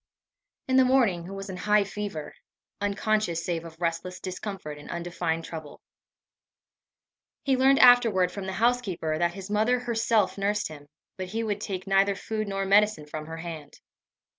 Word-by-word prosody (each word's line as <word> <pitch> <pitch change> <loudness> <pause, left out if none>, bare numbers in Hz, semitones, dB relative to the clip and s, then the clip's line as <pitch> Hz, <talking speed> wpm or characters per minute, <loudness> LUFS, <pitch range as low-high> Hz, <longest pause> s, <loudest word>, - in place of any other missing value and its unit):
In 260 0 +3
the 260 - +7
morning 240 -10 +3
he - - -9
was 195 0 -6
in 190 -2 -6
a - - -7
high 210 0 +4
fever 200 -6 -5 0.5
unconscious 205 -4 0
save 170 -2 -2
of 165 -1 -11
restless 170 +1 -2
discomfort 185 -5 -6
and 145 - -12
undefined 170 -1 -2
trouble. 155 -3 -8 1.6
He 270 -2 +2
learned 265 +1 +5
afterward 230 -8 +6
from 195 -2 -6
the 190 - -3
housekeeper, 195 -9 0
that 170 0 +1
his 195 +1 -8
mother 225 +4 +2
herself 225 -4 +1
nursed 205 -1 0
him, 145 -2 -11 0.3
but 185 -1 -4
he 225 +5 -3
would 210 -2 -2
take 190 -4 -4
neither 195 0 +3
food 215 +1 -3
nor 195 0 -2
medicine 205 -4 +3
from 155 +1 -7
her 165 0 -6
hand. 160 -3 -8
195 Hz, 165 wpm, -27 LUFS, 170-215 Hz, 1.6 s, the